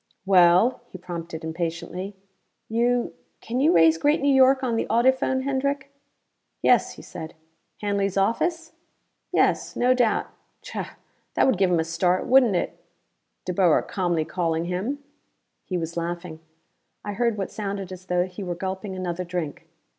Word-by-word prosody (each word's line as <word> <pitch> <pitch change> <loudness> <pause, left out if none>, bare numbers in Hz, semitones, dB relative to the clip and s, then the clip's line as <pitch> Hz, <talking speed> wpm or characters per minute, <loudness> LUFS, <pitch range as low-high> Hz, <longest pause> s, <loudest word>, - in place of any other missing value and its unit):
"Well?" 185 +6 +5
he 185 - -9
prompted 170 -2 -7
impatiently. 170 +4 -4 0.5
"You 240 +2 +1 0.3
can 240 +3 -3
you 290 +4 +4
raise 165 -1 +5
Great 295 +1 +3
New 280 0 +3
York 265 0 +5
on 240 -3 0
the - - -1
audiphone, 260 +2 +2
Hendrick?" 280 0 -1 0.7
"Yes," - - +4
he - - -12
said. 160 -1 -8 0.5
"Hanley's 200 -2 0
office?" 320 - 0 0.6
"Yes, - - +1
no 250 +1 +3
doubt. 245 -4 +2 0.4
Chah - - -6 0.4
that - - +4
would 255 -8 +2
give 190 -2 +4
him 175 -2 +2
a - - +2
start, 175 +3 0
wouldn't 250 -6 +5
it? - - -2 0.7
De 180 - -2
Boer 175 -3 +4
calmly 175 -4 -1
calling 165 -1 -1
him!" 210 +12 -3 0.6
He 185 - -2
was 165 0 -4
laughing. 170 -1 -4 0.7
I 205 - -3
heard 235 0 0
what 195 - -3
sounded 195 -3 -4
as 185 0 -10
though 180 0 +1
he 185 +2 -9
were 180 -2 -3
gulping 190 +2 -4
another 180 -1 -3
drink. 175 -2 -5
190 Hz, 155 wpm, -24 LUFS, 175-245 Hz, 0.7 s, Well